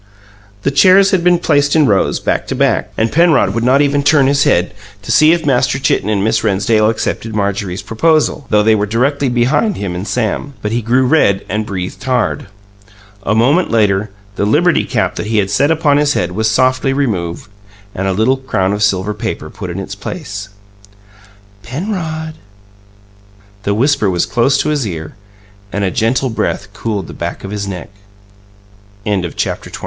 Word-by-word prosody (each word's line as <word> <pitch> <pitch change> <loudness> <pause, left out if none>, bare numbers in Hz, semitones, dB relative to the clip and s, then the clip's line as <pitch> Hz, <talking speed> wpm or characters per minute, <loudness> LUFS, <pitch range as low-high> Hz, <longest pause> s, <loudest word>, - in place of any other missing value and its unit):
The 140 - +1
chairs 185 +7 +5
had 185 -3 +1
been 180 0 +4
placed 145 -3 +1
in 155 -2 +4
rows, 100 -6 +1
back - - -1
to - - -3
back, - - 0
and 110 +1 +1
Penrod 160 - +3
would 115 +1 -1
not 130 +3 +4
even 145 0 +1
turn 140 -1 +4
his 140 +1 +2
head 90 +1 +1 0.3
to 115 - -4
see 155 +6 +5
if 170 -2 0
Master 130 -1 +2
Chitten 110 -6 0
and 100 -2 0
Miss 110 +1 +1
Rennsdale 110 +1 +2
accepted 115 0 -3
Marjorie's 100 -2 -2
proposal, 155 +2 +1
though 105 -1 +3
they 110 +1 +4
were 105 -1 0
directly 135 +5 0
behind 125 - +1
him 100 -3 -4
and 90 +3 -5
Sam; 125 +4 -2
but 105 - -2
he 120 +1 0
grew 125 +4 +2
red 125 -9 +2
and 105 +2 -3
breathed 90 -2 -5
hard. 130 -5 -1 0.7
A 105 - 0
moment 140 +11 +3
later, 105 -2 +1 0.3
the - - 0
liberty 165 +10 +2
cap 115 -5 -1
that - - -4
he 110 0 0
had 100 -1 +1
set 140 +9 +2
upon 155 -3 +2
his 145 0 +2
head 90 0 -1
was 110 +4 0
softly 130 +3 +1
removed, 100 -12 -2 0.5
and 95 +1 -3
a - - +1
little 110 +8 +1
crown 100 -7 -1
of 105 - -3
silver 105 0 +1
paper 105 - -5
put 90 - -7
in 85 - -5
its 95 0 -6
place. 100 - -7 1.1
"PENROD?" 160 - -4 1.3
The 100 0 -1
whisper 120 -3 +2
was 90 -2 0
close 130 +3 +1
to - - -1
his 145 -6 -1
ear, 80 -4 -6 0.6
and 100 - -2
a 95 - 0
gentle 125 +2 0
breath 105 -2 -3
cooled 105 -3 -3
the - - -10
back 85 +1 -5
of 95 - -6
his 100 -1 -4
neck. 90 -3 -6 1.2
CHAPTER 95 -6 -2
XXIV. - - -8
115 Hz, 185 wpm, -15 LUFS, 100-140 Hz, 1.3 s, chairs